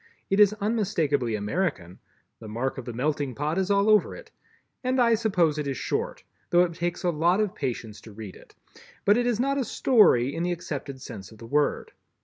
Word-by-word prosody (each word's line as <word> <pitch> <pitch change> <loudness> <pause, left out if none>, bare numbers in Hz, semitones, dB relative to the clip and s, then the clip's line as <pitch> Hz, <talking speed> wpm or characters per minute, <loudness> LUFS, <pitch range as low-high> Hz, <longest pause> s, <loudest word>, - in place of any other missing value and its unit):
It 195 - +2
is 210 0 +6
unmistakably 185 - 0
American—the 105 - -5
mark 120 +5 -3
of 125 - -8
the 120 - -5
"Melting 140 +1 -1
Pot" 150 +5 -1
is 190 0 -1
all 200 +1 +3
over 215 -3 +4
it—and 260 - -7
I 235 -1 +5
suppose 180 -9 +1
it 150 - -3
is 135 -2 -2
Short, - - -3 0.3
though 175 0 +5
it 170 -1 -2
takes 175 +1 -3
a 175 - +2
lot 170 +5 +2
of 210 -3 0
patience 115 -5 -5
to 110 - -13
read 105 -2 -9
it, - - -18 0.5
but 205 - +5
it 245 +1 +1
is 235 -3 0
not 275 +2 +1
a - - +1
story 205 - +3
in 165 - -3
the 175 +1 0
accepted 140 -5 -6
sense 95 -2 -9
of 110 - -14
the 115 - -11
word. 145 +5 0
165 Hz, 200 wpm, -26 LUFS, 130-205 Hz, 0.5 s, is